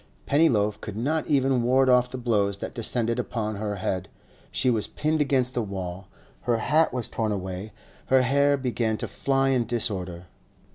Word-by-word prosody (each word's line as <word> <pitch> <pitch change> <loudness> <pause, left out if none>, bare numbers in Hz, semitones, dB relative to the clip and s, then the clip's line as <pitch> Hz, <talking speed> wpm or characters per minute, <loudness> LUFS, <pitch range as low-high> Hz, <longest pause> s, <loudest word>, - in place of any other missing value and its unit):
Pennyloaf 110 -9 +2
could 105 -2 -6
not 150 +7 -1
even 135 -4 +2
ward 130 +2 +3
off 125 -1 +4
the 130 - -6
blows 105 -5 +1
that - - -6
descended 115 0 0
upon 110 -4 -3
her 105 0 -3
head; 95 -1 -3 0.4
she - - 0
was 110 -3 0
pinned 155 0 -1
against 130 -3 +1
the 120 - 0
wall, 95 -2 -5 0.4
her 120 - +4
hat 155 +8 +2
was 125 -3 -3
torn 110 -2 -2
away, 95 +1 -4 0.4
her 130 -1 +4
hair 140 +2 +3
began 120 -4 -1
to - - -4
fly 135 0 +1
in 125 -4 +1
disorder. 95 -7 -2
120 Hz, 175 wpm, -26 LUFS, 105-130 Hz, 0.4 s, off